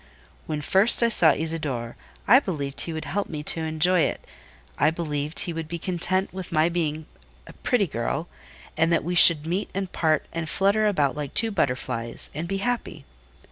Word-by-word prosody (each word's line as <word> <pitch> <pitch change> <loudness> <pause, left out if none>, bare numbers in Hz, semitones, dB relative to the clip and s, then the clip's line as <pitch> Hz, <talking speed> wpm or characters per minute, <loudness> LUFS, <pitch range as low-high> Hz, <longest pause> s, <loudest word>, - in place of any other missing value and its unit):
When 150 -1 -3
first 195 +10 +5
I 235 - +3
saw 170 -7 +5
Isidore, 145 -7 -3 0.3
I 255 - +7
believed 145 - -4
he 170 - -4
would 160 -1 -5
help 205 +1 -3
me 150 -2 -6
to 165 - +1
enjoy 160 +3 +1
it - - -1 0.5
I - - +4
believed 155 -2 -3
he 175 - -2
would 165 -1 -5
be 170 +2 -5
content 185 +2 -1
with 185 -2 -7
my 155 +1 +2
being 160 -3 -3 0.4
a - - -13
pretty 240 -5 0
girl; 150 +3 -3 0.5
and 165 +1 +1
that 170 - +1
we 175 +3 -3
should 170 -3 +7
meet 180 +5 -2
and 195 -2 -3
part 155 -3 0
and 165 -2 -4
flutter 200 +4 +1
about 145 -10 0
like 145 -2 -6
two 225 -1 +1
butterflies, 125 - -3
and 160 +4 -5
be 195 - -2
happy. 245 +4 -4
165 Hz, 185 wpm, -24 LUFS, 150-185 Hz, 0.5 s, I